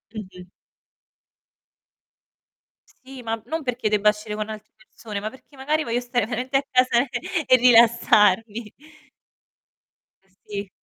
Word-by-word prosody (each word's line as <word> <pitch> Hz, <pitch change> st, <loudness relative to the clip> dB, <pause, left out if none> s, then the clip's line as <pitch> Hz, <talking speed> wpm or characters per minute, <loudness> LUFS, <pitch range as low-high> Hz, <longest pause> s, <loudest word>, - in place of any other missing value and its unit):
Mh-mh. 185 Hz, -4 st, -10 dB, 2.5 s
Sì, 260 Hz, -1 st, -11 dB
ma 225 Hz, -1 st, -4 dB
non 320 Hz, 0 st, -4 dB
perché 250 Hz, -4 st, -2 dB
debba 210 Hz, 0 st, +3 dB
uscire 210 Hz, 0 st, -7 dB
con 215 Hz, 0 st, -4 dB
altre 215 Hz, 0 st, -9 dB
persone, 215 Hz, -1 st, -9 dB
ma 210 Hz, +2 st, -4 dB
perché 260 Hz, +4 st, -19 dB
magari 300 Hz, +4 st, -1 dB
voglio 235 Hz, -1 st, -1 dB
stare 245 Hz, -2 st, -1 dB
veramente 250 Hz, +3 st, -1 dB
a 275 Hz, -, -1 dB
casa 255 Hz, 0 st, +3 dB, 0.4 s
e 255 Hz, -, +6 dB
rilassarmi. 230 Hz, -3 st, +4 dB, 1.5 s
Sì. 200 Hz, +1 st, -9 dB
225 Hz, 115 wpm, -23 LUFS, 210-250 Hz, 2.5 s, e